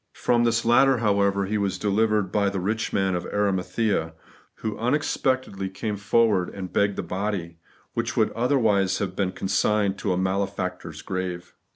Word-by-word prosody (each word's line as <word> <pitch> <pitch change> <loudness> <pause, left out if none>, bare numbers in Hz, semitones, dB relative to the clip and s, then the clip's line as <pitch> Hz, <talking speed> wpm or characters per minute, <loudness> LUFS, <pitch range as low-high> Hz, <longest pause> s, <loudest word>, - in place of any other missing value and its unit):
From 120 -1 +2
this 115 0 +1
latter, 130 +3 +5
however, 100 -3 +2
He 105 +2 -1
was 100 -1 -1
delivered 105 -1 +1
by 100 -1 +2
the 100 -1 -3
rich 110 +5 -2
man 95 -1 +1
of 90 - -2
Arimathea, 95 -3 0 0.4
who 110 -2 -4
unexpectedly 130 -6 0
came 105 +3 -4
forward 100 -2 +2
and 95 -2 -7
begged 100 -1 +2
the - - -3
body, 95 -4 -3 0.3
which - - -2
would - - +3
otherwise 110 -6 +2
have 95 -2 -3
been 95 -2 0
consigned 100 +1 0
to 100 - -1
a 90 - +1
malefactor's 90 -3 -2
grave. 90 -2 -4
100 Hz, 160 wpm, -25 LUFS, 95-110 Hz, 0.4 s, latter